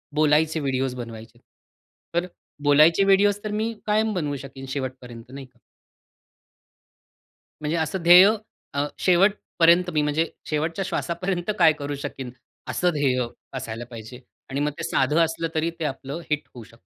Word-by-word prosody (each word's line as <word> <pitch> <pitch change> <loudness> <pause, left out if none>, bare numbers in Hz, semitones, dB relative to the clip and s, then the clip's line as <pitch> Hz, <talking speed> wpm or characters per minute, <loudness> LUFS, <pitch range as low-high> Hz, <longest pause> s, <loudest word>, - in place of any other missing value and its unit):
बोलायचे 155 +1 +3
व्हिडिओज 130 -2 -1
बनवायचेत. 115 -1 -9 0.7
तर, 175 +1 +1 0.4
बोलायचे 155 +6 +5
व्हिडिओज 200 +1 +4
तर 210 - -3
मी 220 +2 -1
कायम 215 +1 +1
बनवू 150 -6 -2
शकेन 135 0 -10
शेवटपर्यंत, 125 -3 -6
नाही 135 0 -8
का? 125 - -27 2.0
म्हणजे 155 +2 -1
असं 160 +3 -2
ध्येय 180 +3 +9 0.5
अ, 140 +1 0
शेवटपर्यंत 180 -2 +3
मी 150 - +2
म्हणजे 150 +2 +1 0.2
शेवटच्या 160 +5 -1
श्वासापर्यंत 180 +2 -2
काय 160 - +6
करू 145 0 -3
शकीन, 130 -3 -6 0.4
असं 180 - +1
ध्येय 130 -4 +1 0.3
असायला 115 -1 -6
पाहिजे. 115 +1 -10 0.3
आणि 135 +1 -3
मग 150 +1 0
ते - - -5
साधं 150 -1 +1
असलं, 165 +1 -3
तरी 160 +1 +1
ते 160 - -2
आपलं 140 +3 -5
हिट 150 0 -1
होऊ 120 - -10
शक 115 +1 -18
150 Hz, 145 wpm, -24 LUFS, 130-175 Hz, 2.0 s, ध्येय